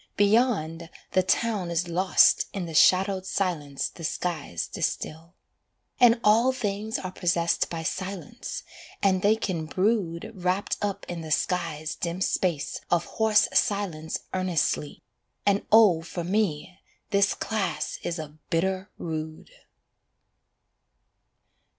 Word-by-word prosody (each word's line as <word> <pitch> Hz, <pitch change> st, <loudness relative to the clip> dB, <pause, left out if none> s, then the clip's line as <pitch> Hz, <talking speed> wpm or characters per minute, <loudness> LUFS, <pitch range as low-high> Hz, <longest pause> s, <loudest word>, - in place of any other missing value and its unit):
Beyond, 200 Hz, -7 st, +2 dB, 0.2 s
the 185 Hz, -, +4 dB
town 200 Hz, -1 st, 0 dB
Is 170 Hz, +1 st, -1 dB
lost 180 Hz, +2 st, +4 dB
in 195 Hz, -3 st, -3 dB
the 165 Hz, -, -7 dB
shadowed 190 Hz, +4 st, +4 dB
silence 165 Hz, -8 st, -2 dB
the 170 Hz, -, -12 dB
skies 155 Hz, -, -3 dB
distil. 165 Hz, +3 st, -4 dB, 0.6 s
And 240 Hz, -2 st, +6 dB
all 225 Hz, +5 st, +5 dB
things 215 Hz, -3 st, -2 dB
are 185 Hz, -, -5 dB
possessed 170 Hz, -2 st, +1 dB
by 165 Hz, -1 st, -4 dB
silence, 195 Hz, +7 st, -5 dB, 0.4 s
and 190 Hz, -2 st, +3 dB
they 205 Hz, +3 st, +4 dB
can 175 Hz, -8 st, -3 dB
brood 190 Hz, +1 st, 0 dB
Wrapped 185 Hz, 0 st, -1 dB
up 205 Hz, -1 st, -2 dB
in 175 Hz, -1 st, -5 dB
the 160 Hz, -, -7 dB
sky's 155 Hz, -1 st, -1 dB
dim 170 Hz, +1 st, -4 dB
space 175 Hz, -5 st, -1 dB
of 175 Hz, -1 st, +2 dB
hoarse 220 Hz, -1 st, +3 dB
silence 175 Hz, -6 st, 0 dB, 0.2 s
Earnestly 180 Hz, -5 st, -1 dB, 0.4 s
and 200 Hz, 0 st, +2 dB
oh 210 Hz, -7 st, +6 dB
for 170 Hz, +1 st, -5 dB
me 185 Hz, -2 st, -1 dB, 0.3 s
this 200 Hz, 0 st, +3 dB
class 215 Hz, -3 st, -2 dB
is 170 Hz, -, -3 dB
a 155 Hz, -1 st, -8 dB
bitter 190 Hz, +3 st, 0 dB
rood. 160 Hz, -, -6 dB
185 Hz, 120 wpm, -26 LUFS, 165-205 Hz, 0.6 s, And